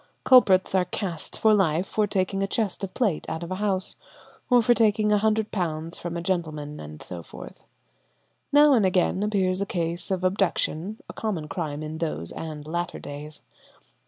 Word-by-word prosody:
Culprits 195 -9 +5
are 185 -1 +3
"cast" 180 -3 -4
for 220 -1 +4
life 180 -3 +2
for 210 0 0
taking 195 0 -1
a 195 - +1
chest 205 -1 -1
of 195 - -3
plate 210 -11 0
out 160 +1 -4
of 170 - -7
a - - -1
house; 195 -3 -1 0.5
or 245 -2 +5
for 240 - +5
taking 215 -2 +3
£100 200 -7 0
from 170 0 -4
a 170 - -4
gentleman 155 -5 -3
and 75 0 -9
so 90 -2 -7
forth. - - -12 0.9
Now 290 0 +7
and 230 -5 +4
again 185 0 +2
appears 195 -3 +1
a 200 - -1
case 170 -1 -2
of 185 -2 -1
abduction, 190 0 0
a - - -8
common 185 -9 -3
crime 150 0 -4
in 155 +1 -6
those 155 - -3
and 155 -2 -7
later 175 +2 -3
days. 150 +1 -8
185 Hz, 175 wpm, -25 LUFS, 160-210 Hz, 0.9 s, Now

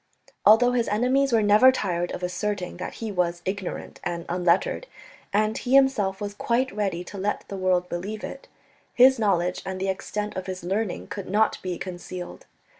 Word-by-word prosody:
Although 235 +4 +7
his 245 -2 +1
enemies 255 +6 +2
were 225 -2 +3
never 210 +5 +7
tired 175 -8 -2
of 180 - -6
asserting 180 0 -3
that 180 - -6
he 225 -2 -5
was 175 -2 -1
ignorant 190 -1 -4
and 170 -1 -3
unlettered, 180 - +1 0.4
and 215 +2 +1
he 255 +1 0
himself 240 -8 +3
was 205 -1 -4
quite 240 +3 0
ready 195 -5 -1
to 195 +2 -9
let 205 +2 -2
the 200 - -5
world 185 -1 +1
believe 200 +6 -5
it, 275 - -7 0.5
his 260 0 +6
knowledge 180 -4 +1
and 190 0 -5
the 190 +1 -1
extent 210 +2 -3
of 185 0 -5
his 185 -2 -5
learning 195 +2 -2
could 200 -3 -7
not 215 +3 +2
be 180 -2 -3
concealed. 180 -1 -7
200 Hz, 180 wpm, -25 LUFS, 180-220 Hz, 0.5 s, Although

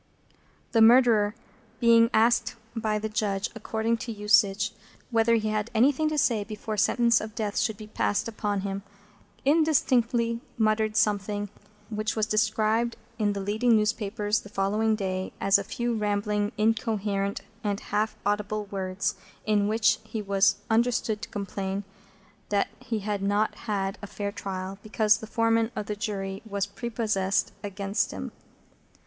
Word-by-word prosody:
The 225 - +4
Murderer, 225 -3 +6 0.4
being 230 -1 +6
asked 230 +2 +3 0.2
by 215 -2 0
the 215 +1 -2
Judge, 210 -1 -1
according 225 +1 -1
to 240 0 -5
usage, 210 0 +3 0.4
whether 230 0 +4
he 215 -1 0
had 215 +1 -1
anything 280 +6 +3
to 310 - -2
say 230 -7 +2
before 215 +1 -5
sentence 235 +3 +3
of 215 0 -7
Death 210 -2 -1
should 220 -3 0
be 215 - -9
passed 210 0 -1
upon 210 -3 -2
him, 195 0 -3 0.6
indistinctly 250 -6 +2 0.2
muttered 215 -1 +1
something 205 -1 +1 0.4
which 215 0 -2
was 215 -1 +1
described 220 +2 +1 0.2
in 205 -1 +2
the 200 - -4
leading 220 +4 +2
newspapers 210 0 0
of - - -15
the - - -10
following 210 +3 +1
day 190 -2 -3
as 195 0 +4
"a - - -3
few 240 +4 -2
rambling, 210 -1 0
incoherent, 210 -2 0 0.2
and 205 -1 -1
half 215 +1 0
audible 210 +1 -1
words, 190 +1 -2 0.3
in 210 -1 +2
which 215 0 +3
he 220 0 -5
was 200 -1 +3
understood 225 -2 +1
to - - -6
complain 195 -1 -4 0.7
that 200 -1 +1
he 225 -2 -3
had 205 0 -2
not 205 +2 +1 0.2
had 195 -2 -1
a 205 - -6
fair 200 0 -4
trial, 190 0 -5
because 215 0 +2
the 220 - -9
Foreman 225 0 +2
of 215 - -3
the 210 - -3
Jury 195 -2 -4
was 200 -3 -2
prepossessed 205 -2 -1
against 200 +1 -1
him." - - -6
215 Hz, 150 wpm, -27 LUFS, 200-225 Hz, 0.7 s, Murderer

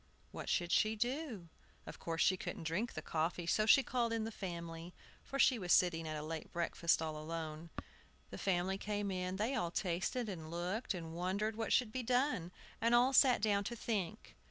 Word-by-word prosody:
What - - -6
should 175 -1 +1
she 215 +1 +3
do? 240 - -2 0.4
Of - - -9
course 165 0 0
she 190 - +4
couldn't 180 - -5
drink 175 +9 -1
the 155 - -5
coffee; 165 +2 -1
so 215 +5 +2
she 270 +4 +7
called 240 -3 0
in 225 -1 0
the 225 - -4
family, 170 -3 -6 0.3
for 275 - -5
she 260 -3 +5
was 180 -3 -2
sitting 165 -3 +4
at 155 -1 -3
a 150 - -5
late 160 0 -5
breakfast 170 -1 +1
all 155 -1 -3
alone. 160 +1 -5 0.6
The - - -7
family 190 0 0
came 205 -1 -2
in; 185 0 -2
they 215 +7 0
all 225 -10 0
tasted, 185 +7 -1
and 165 -6 -6
looked, 180 +6 -2
and 165 -2 -6
wondered 190 +5 -1
what 225 -1 -3
should 245 -4 +3
be 255 - -2
done, 245 - +1 0.3
and 230 +1 +4
all 250 +3 +5
sat 250 -5 +6
down 205 -2 +3
to 235 - -3
think. 215 -3 -3
190 Hz, 200 wpm, -36 LUFS, 170-225 Hz, 0.6 s, she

